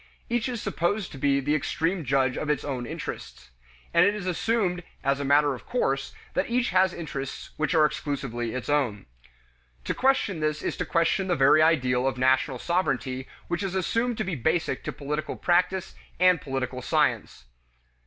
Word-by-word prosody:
Each 240 Hz, +1 st, 0 dB
is 240 Hz, -2 st, -3 dB
supposed 200 Hz, +2 st, -1 dB
to 135 Hz, -, -9 dB
be 140 Hz, 0 st, +3 dB
the 145 Hz, +2 st, 0 dB
supreme 165 Hz, +5 st, -1 dB
judge 130 Hz, -1 st, +1 dB
of 150 Hz, -, -3 dB
its 150 Hz, -2 st, 0 dB
own 130 Hz, -4 st, -3 dB
interests, 65 Hz, -, -7 dB, 0.4 s
and 170 Hz, -, +6 dB
it 200 Hz, +2 st, +3 dB
is 205 Hz, -3 st, -5 dB
assumed 185 Hz, 0 st, 0 dB, 0.2 s
as 140 Hz, +1 st, +1 dB
matter 145 Hz, +1 st, +4 dB
of 125 Hz, -, -10 dB
course 135 Hz, -, -1 dB, 0.2 s
that -, -, 0 dB
each 240 Hz, -2 st, +1 dB
has 185 Hz, 0 st, +4 dB
interests 140 Hz, -6 st, -6 dB
which 155 Hz, +3 st, 0 dB
are 155 Hz, -1 st, +6 dB
exclusively 130 Hz, -6 st, -3 dB
its 130 Hz, -, -4 dB
own. 135 Hz, -9 st, 0 dB, 0.8 s
To -, -, -1 dB
question 260 Hz, -9 st, +1 dB
this 155 Hz, 0 st, -1 dB
is -, -, -2 dB
to -, -, -2 dB
question 170 Hz, +3 st, +1 dB
the 175 Hz, -, +2 dB
very 140 Hz, +2 st, +5 dB
idea 130 Hz, -6 st, +3 dB
of 130 Hz, 0 st, 0 dB
national 130 Hz, +1 st, +2 dB
sovereignty 130 Hz, -6 st, -1 dB, 0.2 s
which 175 Hz, +2 st, -2 dB
is 195 Hz, -2 st, -3 dB
assumed 230 Hz, +5 st, 0 dB
to -, -, 0 dB
be 185 Hz, -, -3 dB
basic 160 Hz, +4 st, 0 dB
to -, -, -2 dB
political 150 Hz, +2 st, -4 dB
practice 180 Hz, +1 st, +1 dB, 0.3 s
and 180 Hz, -2 st, +5 dB
political 130 Hz, -2 st, -3 dB
science. -, -, 0 dB
155 Hz, 175 wpm, -26 LUFS, 135-185 Hz, 0.8 s, and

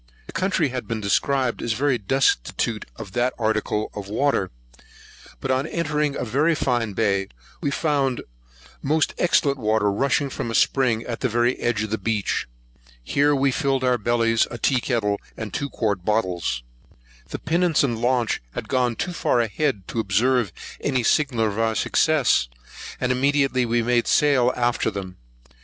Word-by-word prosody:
The -, -, -10 dB
country 170 Hz, -3 st, +1 dB
had 125 Hz, 0 st, -5 dB
been 115 Hz, -1 st, -2 dB
described 125 Hz, +5 st, 0 dB
as 115 Hz, -, -1 dB
very 130 Hz, +1 st, +1 dB
destitute 125 Hz, -, 0 dB
of 95 Hz, -, -9 dB
the 120 Hz, +4 st, +1 dB
article 110 Hz, -1 st, -1 dB
of 100 Hz, -2 st, -6 dB
water; 110 Hz, -4 st, +1 dB, 0.9 s
but 135 Hz, -, -2 dB
on 130 Hz, +3 st, 0 dB
entering 150 Hz, -4 st, -1 dB
a -, -, -3 dB
very 145 Hz, +8 st, +2 dB
fine 120 Hz, -7 st, 0 dB
bay, 100 Hz, -2 st, +1 dB, 0.3 s
we -, -, 0 dB
found 140 Hz, -4 st, 0 dB, 0.6 s
most 155 Hz, +3 st, +1 dB
excellent 140 Hz, -5 st, +2 dB
water 110 Hz, -2 st, +1 dB
rushing 140 Hz, +5 st, 0 dB
from 115 Hz, -, -4 dB
a 115 Hz, -, -3 dB
spring 120 Hz, -4 st, +2 dB
at 120 Hz, -1 st, -5 dB
the 130 Hz, -, 0 dB
very 120 Hz, +2 st, +2 dB
edge 110 Hz, -3 st, 0 dB
of 110 Hz, -, -5 dB
the 110 Hz, -, -1 dB
beach. 105 Hz, -, -1 dB, 0.6 s
Here 145 Hz, -, +2 dB
we 135 Hz, 0 st, +2 dB
filled 135 Hz, -1 st, 0 dB
our 125 Hz, -1 st, +2 dB
bellies, 115 Hz, 0 st, +2 dB
a 120 Hz, -, -6 dB
tea 130 Hz, +1 st, +2 dB
kettle, 105 Hz, -6 st, -1 dB, 0.2 s
and 110 Hz, -3 st, -6 dB
two 140 Hz, -, -2 dB
quart 100 Hz, -8 st, -1 dB
bottles. 90 Hz, -, -1 dB, 0.7 s
The -, -, -4 dB
pinnace 170 Hz, -2 st, +1 dB
and 120 Hz, -5 st, -1 dB
launch 120 Hz, -1 st, +1 dB
had -, -, -5 dB
gone 125 Hz, -2 st, +1 dB
too 180 Hz, -, -3 dB
far 125 Hz, -, +1 dB
ahead 115 Hz, -2 st, -1 dB
to 115 Hz, -, -3 dB
observe 110 Hz, +1 st, +1 dB, 0.3 s
any 130 Hz, -4 st, 0 dB
signal 125 Hz, -5 st, +2 dB
of 105 Hz, 0 st, -2 dB
our 110 Hz, 0 st, +1 dB
success; 150 Hz, -, +2 dB, 0.5 s
and 125 Hz, -, 0 dB
immediately 135 Hz, -1 st, +2 dB
we 120 Hz, 0 st, +1 dB
made 120 Hz, 0 st, +1 dB
sail 135 Hz, -4 st, +4 dB
after 120 Hz, -1 st, +1 dB
them. 95 Hz, -2 st, -7 dB
120 Hz, 165 wpm, -23 LUFS, 110-140 Hz, 0.9 s, sail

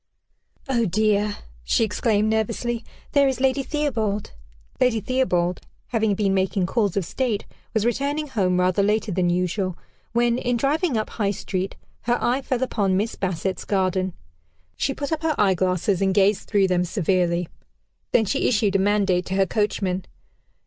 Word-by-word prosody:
"Oh, 240 Hz, -4 st, +1 dB
dear!" 210 Hz, +2 st, +1 dB, 0.3 s
she -, -, +2 dB
exclaimed 215 Hz, 0 st, +1 dB
nervously, 225 Hz, +2 st, -1 dB, 0.3 s
"there 280 Hz, -1 st, +4 dB
is 265 Hz, -1 st, -1 dB
Lady 265 Hz, +1 st, +2 dB
Theobald." 225 Hz, -9 st, -1 dB, 0.5 s
Lady 250 Hz, -3 st, +3 dB
Theobald, 185 Hz, -8 st, 0 dB, 0.3 s
having 220 Hz, -4 st, +1 dB
been 195 Hz, -1 st, +1 dB
making 190 Hz, 0 st, +1 dB
calls 205 Hz, -1 st, 0 dB
of 190 Hz, -, 0 dB
state, 235 Hz, 0 st, -2 dB, 0.3 s
was 220 Hz, 0 st, +2 dB
returning 280 Hz, +6 st, 0 dB
home 190 Hz, -9 st, +1 dB
rather 185 Hz, +2 st, +2 dB
later 210 Hz, +1 st, +1 dB
than 180 Hz, -1 st, +1 dB
usual, 180 Hz, +1 st, -1 dB, 0.3 s
when, 240 Hz, +1 st, +2 dB
in 245 Hz, -1 st, 0 dB
driving 285 Hz, +1 st, +1 dB
up 215 Hz, -, -2 dB
High 205 Hz, -3 st, 0 dB
Street, 190 Hz, -1 st, -3 dB, 0.3 s
her 240 Hz, +1 st, +2 dB
eye 250 Hz, +3 st, +1 dB
fell 260 Hz, -1 st, -1 dB
upon 200 Hz, -7 st, +1 dB
Miss 215 Hz, +4 st, -1 dB
Bassett's 185 Hz, 0 st, -2 dB
garden. 185 Hz, -2 st, 0 dB, 0.6 s
She 270 Hz, -, -1 dB
put 285 Hz, 0 st, -4 dB
up 320 Hz, -1 st, -1 dB
her 320 Hz, -2 st, +1 dB
eyeglasses, 185 Hz, -1 st, +2 dB
and 190 Hz, -1 st, +2 dB
gazed 200 Hz, 0 st, +2 dB
through 200 Hz, -3 st, +3 dB
them 180 Hz, -1 st, +2 dB
severely; 180 Hz, -2 st, 0 dB, 0.6 s
then 225 Hz, -, +4 dB
she -, -, 0 dB
issued 205 Hz, -4 st, +2 dB
a -, -, +4 dB
mandate 195 Hz, -2 st, +2 dB
to 190 Hz, -, -2 dB
her 195 Hz, 0 st, +3 dB
coachman. 190 Hz, -3 st, -1 dB
205 Hz, 160 wpm, -23 LUFS, 185-240 Hz, 0.6 s, there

